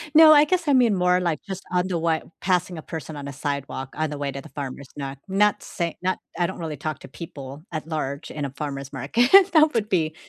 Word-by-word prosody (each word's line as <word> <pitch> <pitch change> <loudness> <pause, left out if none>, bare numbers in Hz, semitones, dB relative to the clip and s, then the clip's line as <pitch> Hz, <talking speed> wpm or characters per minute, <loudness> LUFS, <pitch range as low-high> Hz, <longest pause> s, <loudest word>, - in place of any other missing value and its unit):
No, 315 0 +10
I 295 0 +7
guess 355 -3 0
I 285 - +4
mean 240 -6 +4
more 180 0 +3
like 170 -4 -1
just 190 -2 -6
on 180 0 +1
the 180 -2 -1
way, 160 -1 +1 0.2
passing 180 -1 0
a - - -6
person 160 -1 -7
on 140 -1 -6
a 140 - -6
sidewalk 140 -1 -4
on 155 0 0
the 145 - -5
way 140 -1 -2
to 140 - -6
the 155 - -13
farmer's, 140 -1 -6
not 140 -1 -5
not 205 +2 +2
say 170 -2 -4
not 185 +1 0 0.2
I 175 0 +2
don't 190 - -7
really 160 -4 -4
talk 155 +1 -4
to - - -11
people 140 -1 -9
at 155 -1 -5
large 140 -3 -4
in 145 -2 -3
a - - -3
farmer's 140 -1 -5
market. 150 - +1 0.2
That 310 -1 +6
would 215 -2 0
be 160 -5 +1
160 Hz, 245 wpm, -24 LUFS, 140-190 Hz, 0.2 s, No